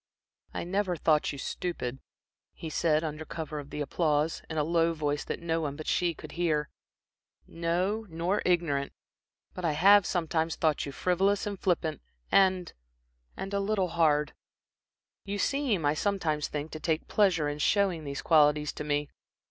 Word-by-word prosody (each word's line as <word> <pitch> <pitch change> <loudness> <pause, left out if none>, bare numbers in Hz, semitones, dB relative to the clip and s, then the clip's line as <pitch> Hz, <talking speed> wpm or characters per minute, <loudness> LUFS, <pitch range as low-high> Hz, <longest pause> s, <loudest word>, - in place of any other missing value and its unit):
"I - - -4
never 185 +1 0
thought 155 -1 +2
you 140 - -7
stupid," 135 -4 -4 0.6
he 160 - -7
said, 155 0 +2
under 155 0 -4
cover 155 -1 -5
of 145 -1 -9
the 150 - -5
applause, 150 +1 0
in 160 - -4
a 150 - +2
low 165 +1 +2
voice 150 -1 -1
that - - -5
no 165 -1 0
one 145 -3 -3
but 155 +1 -8
she 175 -2 +1
could - - -10
hear, 155 -4 0 0.8
"no, 180 +6 -1
nor 170 +5 -1
ignorant; 165 -6 +1 0.6
but 180 - -7
I 160 -3 +1
have 195 +5 +6
sometimes 165 -2 0
thought 155 -3 0
you - - -5
frivolous, 190 +6 +1
and 200 -2 -4
flippant, 165 -4 0 0.3
and 185 -2 +3 0.6
and 195 +1 -5
a 200 - +1
little 195 -2 0
hard. 155 -3 +2 0.9
You 200 0 -4
seem, 240 - 0
I 145 - +3
sometimes 155 -4 0
think, 150 +1 -5
to 155 - -6
take 160 0 -1
pleasure 180 -7 +2
in 145 0 -3
showing 190 -2 +2
these 140 -1 -5
qualities 150 -2 +4
to - - -5
me. 145 0 0
165 Hz, 165 wpm, -29 LUFS, 150-180 Hz, 0.9 s, have